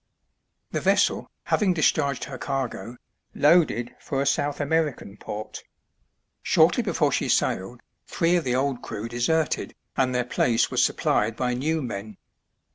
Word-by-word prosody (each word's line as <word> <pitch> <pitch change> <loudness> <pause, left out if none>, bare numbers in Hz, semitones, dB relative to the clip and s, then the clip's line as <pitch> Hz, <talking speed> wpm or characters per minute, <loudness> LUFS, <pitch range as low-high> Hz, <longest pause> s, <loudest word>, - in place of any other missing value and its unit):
The - - -2
vessel, - - +2
having 190 -5 +1
discharged 145 -3 +1
her 130 -2 -7
cargo, 125 -2 -4 0.4
loaded 145 -6 +3
for 135 - -3
a 140 - +1
South 145 +1 0
American 145 -8 -1
port. 105 0 -7 0.8
Shortly - - +4
before - - +1
she - - -1
sailed 110 +6 0 0.3
three 170 +1 +1
of 175 - +1
the 125 -2 0
old 135 -1 0
crew 105 +3 -5
deserted, 125 +7 0 0.2
and 130 -2 +2
their 125 -1 +1
place 120 -1 +1
was - - +3
supplied 110 +1 +1
by 125 0 -1
new 155 +5 -1
men. 105 -3 -6
130 Hz, 140 wpm, -25 LUFS, 120-150 Hz, 0.8 s, Shortly